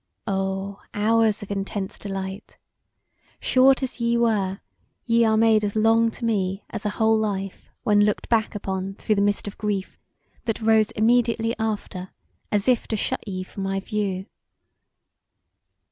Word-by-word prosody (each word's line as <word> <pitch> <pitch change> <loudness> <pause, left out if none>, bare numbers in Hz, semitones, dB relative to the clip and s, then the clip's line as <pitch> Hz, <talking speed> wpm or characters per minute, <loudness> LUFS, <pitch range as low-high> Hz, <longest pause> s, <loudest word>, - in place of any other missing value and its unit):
O, 195 -1 -2
hours 220 0 +2
of 205 - -8
intense 195 0 -3
delight! 195 0 -6 0.8
Short 265 +1 +4
as 260 -1 -4
ye 235 0 +2
were 205 -5 +1 0.5
ye 235 -1 +4
are 220 -1 +3
made 220 -1 +4
as 205 0 -2
long 225 +1 +4
to 230 +1 -5
me 195 -3 0
as 215 -1 -3
a 205 - -4
whole 220 0 +4
life 195 -3 -3
when 205 -1 +4
looked 210 0 0
back 225 -2 +1
upon 195 -1 -3
through 215 - 0
the 200 - +1
mist 205 0 +1
of 205 - -7
grief 205 -3 -3 0.5
that 225 - -1
rose 220 -1 +3
immediately 230 0 +2
after 205 -4 -3 0.4
as 205 +1 +1
if 250 -3 +2
to 220 - -1
shut 210 - -1
ye 185 -2 -3
from 195 - -9
my 195 0 -1
view. 195 -2 -2
210 Hz, 155 wpm, -24 LUFS, 195-225 Hz, 0.8 s, Short